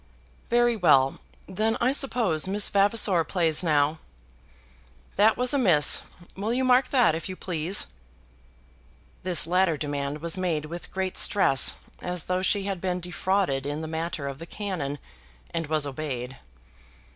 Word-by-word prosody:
"Very 240 0 +3
well; 140 -9 +3 0.3
then 215 +4 -1
I 250 +2 +2
suppose 230 - +1
Miss 200 +2 +2
Vavasor 200 -3 +2
plays 165 -1 +2
now. 150 -1 +1 1.2
That 215 +2 +4
was 250 +1 +1
a 280 - +2
miss. 170 - +5 0.3
Will 205 +4 -3
you 255 +2 0
mark 255 +1 +4
that, 245 - +3
if 165 +4 -5
you 185 - -5
please?" 175 +1 0 1.4
This 180 -3 +1
latter 180 -2 +1
demand 145 0 -3
was 170 +3 -1
made 165 -5 -1
with 170 +3 -8
great 190 -1 -1
stress, 160 -10 +3 0.3
as 180 -2 -2
though 180 0 -2
she 195 +1 0
had 195 -3 -4
been 180 -1 -2
defrauded 180 -5 -1
in 145 +2 -4
the 160 - -5
matter 160 -2 -4
of 135 0 -6
the 165 - -9
cannon, 175 -9 -4 0.5
and 165 -2 -3
was 155 -1 +1
obeyed. 135 -3 -5
180 Hz, 150 wpm, -25 LUFS, 155-200 Hz, 1.4 s, miss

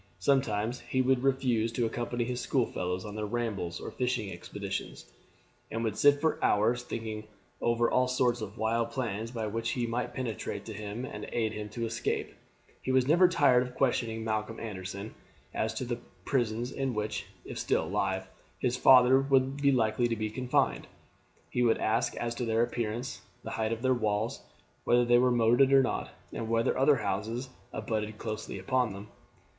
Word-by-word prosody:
Sometimes 120 -4 +1
he 130 - -2
would 130 -1 +3
refuse 125 -4 +1
to 120 0 +1
accompany 120 +1 -2
his 125 +1 -3
school 130 -4 +1
fellows 90 -1 -3
on 105 - -6
their 105 -1 -3
rambles 105 -7 -2
or - - -6
fishing 125 -5 -1
expeditions, 85 -7 -5 0.6
and 115 +1 -3
would 110 -3 -1
sit 145 +5 +5
for 160 +1 0
hours 115 +4 +3
thinking 110 -3 -5 0.3
over 120 0 +2
all 130 +1 +2
sorts 125 -2 +1
of 105 +1 -6
wild 115 +1 +1
plans 115 -3 -3
by 115 -2 -3
which 115 +2 -2
he 120 -2 -1
might 120 +2 -3
penetrate 120 -4 -4
to 110 - -6
him 105 +4 -5
and - - -7
aid 110 -2 0
him 105 -1 -5
to 115 +2 -3
escape. 115 +1 -2 0.5
He 130 - -2
was 130 -1 +3
never 175 +5 +6
tired 140 -8 +4
of 125 0 -5
questioning 115 -4 0
Malcolm 110 0 -2
Anderson 100 -1 -6 0.4
as 110 - 0
to 130 - -3
the 120 0 -3 0.3
prisons 120 -2 0
in 135 -3 -2
which, 105 0 -3 0.2
if - - -6
still - - +1
alive, 95 +2 -1 0.3
his 125 -1 0
father 130 0 +7
would 135 0 +2
be 140 -1 +3
likely 120 -1 +2
to 115 - -1
be 110 -1 -3
confined. 125 +2 0 0.6
He 125 - 0
would 115 -2 +4
ask 110 +1 0
as 120 0 -2
to 120 - -3
their 115 0 +2
appearance, 120 +1 -3 0.2
the - - -6
height 110 0 -1
of 115 +1 -3
their 130 0 +4
walls, 110 -2 -1 0.4
whether 120 0 +4
they 120 0 +5
were 125 0 +4
moated 120 +3 +4
or 135 -1 +7
not, - - -2 0.2
and 110 - -4
whether 115 0 +2
other 135 +2 +5
houses 110 +3 -2 0.2
abutted 110 -1 -3
closely 110 -2 -5
upon 125 +2 0
them. 100 +2 -9
115 Hz, 185 wpm, -30 LUFS, 110-125 Hz, 0.6 s, father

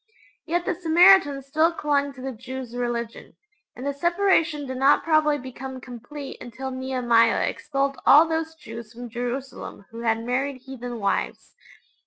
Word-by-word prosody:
Yet 345 +1 0
the - - 0
Samaritans 335 -4 +5
still 315 +4 +2
clung 285 -3 0
to 260 - -12
the 265 +1 -4
Jews' 255 +1 -8
religion, 240 -1 -4 0.4
and 250 - -8
the 280 - -1
separation 340 -1 +1
did 260 -1 -5
not 270 +2 +4
probably 310 -2 +3
become 260 0 -8
complete 255 +3 -9
until 260 +3 -6
Nehemiah 255 -3 +2
expelled 275 -2 -2
all 310 +3 +7
those 320 0 -2
Jews 230 -5 -10
from 240 0 -9
Jerusalem 245 -2 -5
who 230 - -9
had 225 -1 0
married 260 +1 -2
heathen 245 -3 -7
wives. 200 - -2
265 Hz, 150 wpm, -24 LUFS, 245-300 Hz, 0.4 s, all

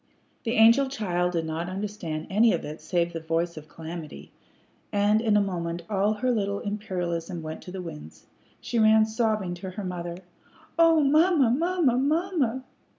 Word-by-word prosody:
The 230 - 0
angel 235 +4 +5
child 180 -8 -1
did 165 -1 -1
not 160 +2 -3
understand 185 -5 -4
anything 215 0 +4
of - - -9
it 150 +2 -7
save 170 +1 -1
the 165 - -3
voice 165 +2 -1
of 155 0 -10
calamity, 160 - -8 0.6
and 205 +1 +3
in 215 -3 +3
a - - +4
moment 170 -3 -3
all 205 +1 +2
her 250 +4 0
little 200 -3 -1
imperialism 180 -5 -4
went 155 0 -6
to 180 - -10
the 185 -1 -6
winds. 75 - -10 0.3
She 235 - -2
ran 220 0 +6
sobbing 220 -4 -1
to 180 +2 -7
her 200 +3 -6
mother. 175 -2 -5 0.6
"Oh, 330 -1 +6
mamma! 305 -2 +4
mamma! 320 -3 +2
mamma!" 290 -4 0
200 Hz, 165 wpm, -26 LUFS, 170-230 Hz, 0.6 s, ran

